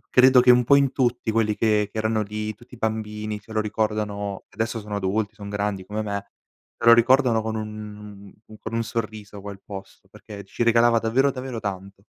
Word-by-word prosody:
credo 130 0 +7
che 125 - +3
un 125 0 +5
po' 140 +4 +5
in 140 -2 +3
tutti 120 -3 0
quelli 110 -1 +1
che 105 -2 +1
che - - -8
erano 110 0 +1
lì, 105 +1 -4
tutti 120 +3 -15
i - - -16
bambini 110 -1 -3
se 110 +2 -17
lo 110 - +1
ricordano, 105 -2 -2
adesso 115 0 -3
sono 105 0 -6
adulti, 100 +2 -1
son 100 -2 -8
grandi 100 -2 -2
come 105 +2 -3
me, 100 -1 -5 0.5
se - - -4
lo 115 - +10
ricordano 120 -1 +4
con 110 0 -3
un 105 -2 -8
un 110 - -14
con 110 - -7
un 115 0 0
sorriso 110 -2 -5
quel 100 -1 -9
posto, 95 -1 -10
perché 100 -1 -11
ci 110 - -2
regalava 115 0 +4
davvero, 125 +5 +2
davvero 130 -2 -5
tanto. 100 -1 -6
110 Hz, 200 wpm, -24 LUFS, 105-115 Hz, 0.5 s, lo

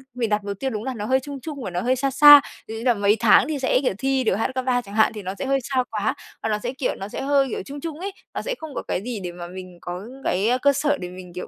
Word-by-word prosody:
mình 235 -3 -1
đặt 210 -1 0
mục 200 -1 -5
tiêu 270 - -1
đúng 215 -4 -4
là 260 +1 -3
nó 210 -4 -5
hơi 260 +4 +3
chung 280 +1 -7
chung 285 -2 -6
và - - -3
nó 175 0 -2
hơi 255 +2 +2
xa 270 +1 -1
xa, 290 +2 +10 0.3
ví 220 - -6
dụ - - -5
như - - -7
là 245 - +5
mấy 205 0 +2
tháng 230 +3 +5
thì 305 -2 -2
sẽ, 260 -1 +2
kiểu, 255 - +1
thi 270 +2 +1
được 220 - +2
HSK 260 +4 -2
3 250 -1 +2
chẳng 205 -3 -11
hạn, 220 0 +4
thì 215 - -6
nó 190 +1 -4
sẽ - - -2
hơi 275 0 +2
xa 260 0 0
quá, 215 0 0 0.3
và 225 - 0
nó 210 -1 0
sẽ, 245 +4 -4
kiểu, 265 -1 -2
nó 195 - -6
sẽ - - -6
hơi, 275 0 +2
kiểu, - - -3
chung 285 +1 -7
chung 320 -1 -5
ấy, 390 +3 -4 0.2
nó - - -3
sẽ - - -3
không 315 -2 -8
có - - -2
cái - - -1
gì 240 -3 -4
để 175 - -4
mà 175 0 -8
mình 185 0 -10
có 180 +3 -6 0.2
cái, 195 +5 +1
ơ, 250 - +3
cơ 280 +1 +5
sở 290 +1 +1
để 180 - -6
mình, 180 -1 -11
kiểu, 180 - -6
245 Hz, 335 wpm, -23 LUFS, 205-270 Hz, 0.3 s, xa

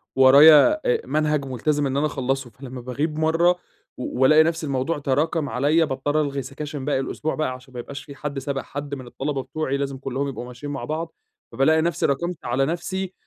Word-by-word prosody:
ورايا 145 - +8
أ 470 -2 +1
منهج 150 -2 0
ملتزم 145 +3 -1
إن 135 +1 -2
أنا 145 - +2
اخلصه، 135 -3 -2
فلمَّا 125 +2 -9
باغيب 145 +6 -3
مرة 165 +3 +3 0.4
والاقي 135 +5 +4
نفس 165 0 -1
الموضوع 140 +2 -1
تراكم 145 +3 0
عليَّا 145 +8 +2
باضطر 145 +2 0
الغي 140 -2 -2
سكاشن 140 +1 -6
باقي 145 -2 +1
الأسبوع 155 +3 -3
بقى، 155 -4 -1
عشان 130 +1 -13
ما 125 - -6
يبقاش 140 +4 -7
في 140 - -11
حد 145 -1 -4
سابق 135 0 -3
حد 145 0 -6
من 130 -2 -9
الطلبة 135 +2 -3
بتوعي 140 0 -2
لازم 140 -1 -3
كلهم 135 +1 -3
يبقوا 130 -3 -5
ماشيين 125 +4 -8
مع 140 - -5
بعض، 160 +2 -4 0.4
فبالاقي 155 +6 +3
نفسي 170 -1 0
راكمت 170 +4 -2
على 125 +3 +1
نفسي 185 +4 -3
140 Hz, 190 wpm, -23 LUFS, 135-155 Hz, 0.4 s, ورايا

